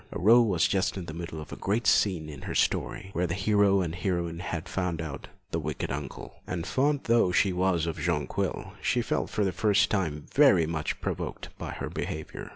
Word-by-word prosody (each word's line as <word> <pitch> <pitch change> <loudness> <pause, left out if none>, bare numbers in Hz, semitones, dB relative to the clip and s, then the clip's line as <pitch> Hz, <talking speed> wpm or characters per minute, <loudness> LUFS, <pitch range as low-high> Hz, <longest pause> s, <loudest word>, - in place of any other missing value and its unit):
Aurore 115 +6 +6
was 90 -6 +3
just 95 0 0
in 90 - -4
the 80 - -7
middle 85 -1 -6
of 75 -3 -9
the - - -6
great 110 +4 -1
scene 90 -7 +3
in 75 -3 -9
her - - -5
story, 95 - 0
where 90 +1 0
the 85 - -2
hero 100 -1 +3
and 85 -3 -2
heroine 85 -2 -2
had 85 -1 -4
found 90 -3 -2
out 75 -4 -6 0.2
the - - 0
wicked - - -3
uncle, 70 -2 -6
and 90 -2 -3
fond 140 +5 +1
though 115 -6 +3
she 95 +1 +3
was 90 -2 +1
of 80 -2 -3
Jonquil, 75 -3 -2
she - - +1
felt - - -1
for 105 - 0
the 95 - +1
first 105 +3 +2
time 80 -8 -1
very 135 - +6
much 80 -1 -3
provoked - - -4
by - - -5
her - - -5
behaviour. 80 0 -5
90 Hz, 205 wpm, -28 LUFS, 80-100 Hz, 0.2 s, Aurore